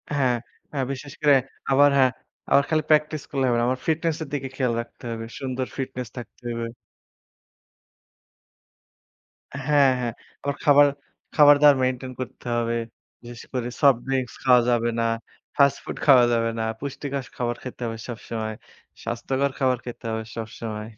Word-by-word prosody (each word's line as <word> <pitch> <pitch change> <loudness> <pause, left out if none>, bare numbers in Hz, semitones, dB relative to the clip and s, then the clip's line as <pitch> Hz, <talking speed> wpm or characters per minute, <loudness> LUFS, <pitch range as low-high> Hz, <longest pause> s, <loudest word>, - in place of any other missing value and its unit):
হ্যাঁ, 130 -4 +2 0.4
হ্যাঁ, 135 -3 -1
বিশেষ 140 +1 -7
করে 145 -1 +6 0.4
আবার 145 +1 +6
হ্যাঁ, 130 -2 +5 0.4
আবার 140 - +6
খালি 155 -1 +2
প্র্যাকটিস 150 -1 +3
করলে 135 -2 +1
হবে 120 -1 +2
না। 120 - +1
আমার 130 0 -1
ফিটনেস 160 0 +1
এর - - -8
দিকে 135 -2 -2
খেয়াল 125 -3 0
রাখতে 115 - -15
হবে। 115 0 -5
সুন্দর 130 -1 -2
ফিটনেস 125 -2 -4
থাকতে 120 +1 -10
হবে। 115 0 -3 3.0
হ্যাঁ, 145 -2 +5
হ্যাঁ। 120 -2 -2 0.3
আবার 140 - 0
খাবার 145 0 +7 0.5
খাবার-দাবার 145 -1 +7
মেইনটেইন 130 0 -1
করতে 130 - -8
হবে। 115 0 0 0.5
বিশেষ 120 -1 -10
করে 125 -2 -1
সফট 140 -4 +6
ড্রিংকস 130 -2 -1
খাওয়া 125 -2 +6
যাবে 120 -1 +2
না। - - +2 0.5
ফাস্ট 140 -1 +4
ফুড - - -6
খাওয়া 130 -4 +7
যাবে 115 0 +1
না। - - 0 0.2
পুষ্টিকর 140 -1 -4
খাবার 120 -1 -1
খেতে 125 -1 -8
হবে 115 -1 -4
সবসময়। 110 -2 -5 0.5
স্বাস্থ্যকর 130 +4 -1
খাবার 130 -2 +2
খেতে 120 -1 -8
হবে 110 0 -2
সবসময়। 110 -1 -6
130 Hz, 150 wpm, -24 LUFS, 120-140 Hz, 3.0 s, খাবার